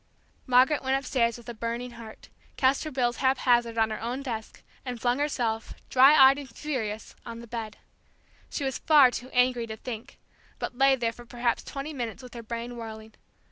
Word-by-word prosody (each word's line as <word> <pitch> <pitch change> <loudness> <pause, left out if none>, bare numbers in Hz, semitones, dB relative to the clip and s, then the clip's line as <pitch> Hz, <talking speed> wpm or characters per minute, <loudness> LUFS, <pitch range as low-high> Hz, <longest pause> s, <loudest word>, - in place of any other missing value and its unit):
Margaret 255 +4 +4
went 265 0 +1
upstairs 245 -4 0
with 235 0 -15
a 240 - -5
burning 235 +2 -4
heart, 230 -2 -12 0.3
cast 265 +3 +2
her - - -3
bills 245 -3 0
haphazard 245 -3 +2
on 220 -1 +2
her 215 - -4
own 245 +4 -3
desk, 225 -5 -6 0.2
and 250 -2 -5
flung 245 +3 +1
herself, 240 -7 -2 0.2
dry 270 +3 +7
eyed 270 0 +7
and 280 -2 -9
furious, 230 -5 -4
on 230 0 -8
the 235 - -9
bed. 225 -2 -6 0.7
She 290 - -4
was 265 -1 -2
far 290 -5 +6
too 245 +1 -6
angry 250 -2 +2
to 220 0 -6
think, 230 -1 -8 0.4
but - - -5
lay 270 0 +6
there 235 -3 -1
for 240 +1 -14
perhaps 240 0 -1
twenty 280 +3 -6
minutes 240 -2 -5
with 250 - -11
her 235 - -7
brain 235 +1 -6
whirling. 220 -1 -8
245 Hz, 190 wpm, -27 LUFS, 230-265 Hz, 0.7 s, dry